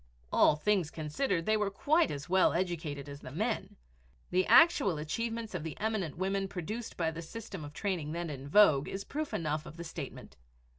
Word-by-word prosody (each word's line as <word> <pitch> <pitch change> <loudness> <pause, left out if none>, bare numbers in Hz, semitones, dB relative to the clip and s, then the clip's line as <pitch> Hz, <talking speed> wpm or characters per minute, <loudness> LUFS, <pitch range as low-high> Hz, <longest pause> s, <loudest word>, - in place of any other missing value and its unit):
All - - +6
things 185 0 +1
considered, 165 - -1
they 215 - +3
were 210 -1 0
quite 310 - +2
as 140 +1 -5
well 185 +1 +4
educated 165 -5 -2
as 140 0 -8
the - - -8
men. 215 - -2 0.6
The 185 +1 +2
actual 290 - +6
achievements 225 +8 -3
of 180 - -3
the 160 -2 -6
eminent 210 -8 -2
women 195 +1 0
produced 210 +6 -5
by 165 -2 0
the 165 +1 -6
system 195 -1 -8
of 145 - -8
training 165 -3 -2
then 170 -1 -3
in 135 -1 -7
vogue 155 -7 +6
is 195 +1 -4
proof 305 +6 -4
enough 155 -1 -2
of 160 - -11
the 170 - -5
statement. 160 -4 -8
175 Hz, 190 wpm, -31 LUFS, 155-210 Hz, 0.6 s, All